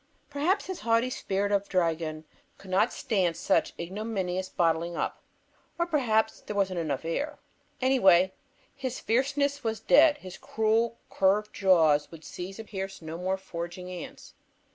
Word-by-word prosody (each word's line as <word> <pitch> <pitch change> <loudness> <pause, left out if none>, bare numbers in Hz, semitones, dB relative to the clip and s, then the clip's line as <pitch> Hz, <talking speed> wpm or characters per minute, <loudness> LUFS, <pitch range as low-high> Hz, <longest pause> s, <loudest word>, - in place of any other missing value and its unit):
Perhaps 315 +8 +1
his 375 -1 -5
haughty 230 +2 +2
spirit 200 -3 -1
of 200 0 +1
dragon 165 -3 -1 0.3
could 190 - -12
not 200 +6 +3
stand 180 -7 0
such 180 -5 +1
ignominious 185 0 -3
bottling 170 0 0
up, - - -3 0.6
or 340 - +1
perhaps 230 -9 +1
there 210 - -6
wasn't 190 -3 0
enough 160 0 -2
air. 290 - -2 0.5
Anyway, 190 -8 +5 0.4
His 260 -2 -4
Fierceness 280 +4 0
was 225 -2 -1
dead. 300 +5 +5
His 185 -9 -10
cruel 225 +1 +1
curved 205 +2 +2
jaws 160 -6 +4
would 165 -1 -12
seize 185 +2 -7
and 220 -1 -8
pierce 195 -3 -6
no 160 +1 -6
more 185 +2 -1
foraging 180 -1 -7
ants. 180 -2 -9
195 Hz, 145 wpm, -28 LUFS, 175-230 Hz, 0.6 s, Anyway